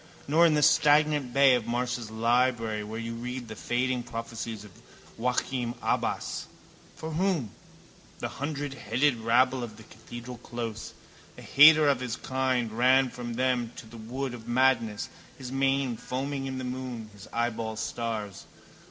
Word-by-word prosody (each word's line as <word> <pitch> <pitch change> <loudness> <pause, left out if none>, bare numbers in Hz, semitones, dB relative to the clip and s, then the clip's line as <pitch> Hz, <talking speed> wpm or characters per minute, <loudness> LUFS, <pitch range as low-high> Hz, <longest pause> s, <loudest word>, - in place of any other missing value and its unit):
Nor 165 +4 +5
in 155 - +3
the 150 - +3
stagnant 150 -2 +4
bay 135 0 +6
of 120 -3 0
Marsh's 120 -1 -2
library 115 -1 +1
where 110 +2 -6
you 115 0 -4
read 125 +1 -5
the 110 - -7
fading 125 +7 -1
prophecies 115 -2 -6
of 105 - -13 0.5
Joachim 125 0 -1
Abbas. - - -1 0.5
For 160 - -6
whom? 165 - 0 0.7
The - - -3
hundredheaded 145 -2 0
rabble 125 +3 +3
of 110 -3 -7
the 110 - -12
cathedral 120 +3 -10
close. 115 -2 -6 0.4
A - - -10
hater 155 +1 +7
of 140 -3 +3
his 125 -2 -3
kind 130 -4 -1
ran 130 +2 +4
from 120 -1 -6
them 125 -2 0
to - - -9
the 115 +1 -12
wood 125 +4 -4
of 115 -1 -10
madness, 120 -4 +2 0.3
his 130 -2 -7
mane 135 -2 +1
foaming 135 +3 -3
in 130 0 -4
the 130 - -4
moon, 125 -3 -5
his 100 -1 -13
eyeballs 115 -2 -2
stars. 110 -5 -4
125 Hz, 150 wpm, -28 LUFS, 115-130 Hz, 0.7 s, hater